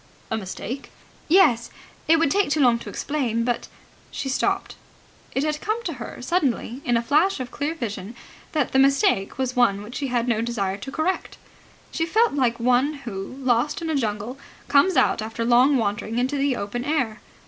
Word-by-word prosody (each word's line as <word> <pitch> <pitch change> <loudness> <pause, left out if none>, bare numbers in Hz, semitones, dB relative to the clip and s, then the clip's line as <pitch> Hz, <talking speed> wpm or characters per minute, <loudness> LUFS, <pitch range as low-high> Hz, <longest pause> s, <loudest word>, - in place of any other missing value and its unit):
"A - - +1
mistake?" 220 +6 -6 0.4
"Yes. 305 -10 +4 0.4
It 325 +1 +6
would 315 -3 +2
take 400 -2 +2
too 305 - +1
long 245 -4 +4
to - - -8
explain, 245 -6 -1
but.. 240 0 -1 0.2
." - - -29
She 270 - -4
stopped. 265 - -1 0.6
It 270 - +1
had 300 -1 -1
come 435 +2 -2
to 340 - -3
her 235 - -7
suddenly, 265 -5 -1
in 245 -6 +2
a 230 - -1
flash 310 +8 +2
of 255 -1 -5
clear 295 +3 -2
vision, 225 - -5 0.4
that 300 -5 0
the 265 - +3
mistake 270 -8 +3
was 260 -1 -1
one 205 -5 +3
which 240 +4 -7
she 280 - -2
had 240 -1 0
no 225 -2 +1
desire 200 -5 -2
to 240 +7 -8
correct. 325 +5 -2 0.5
She 325 - -1
felt 440 +5 +3
like 245 -4 +1
one 250 +5 +3
who, 195 +1 -6
lost 255 +3 +1
in 330 -2 -3
a - - 0
jungle, 225 +1 -2 0.3
comes 290 +7 +4
out - - +3
after 225 +1 -3
long 250 +4 +5
wandering 215 0 -2
into 255 +3 0
the 280 -2 +1
open 220 +3 -4
air. 255 -7 -1
255 Hz, 190 wpm, -24 LUFS, 230-295 Hz, 0.6 s, It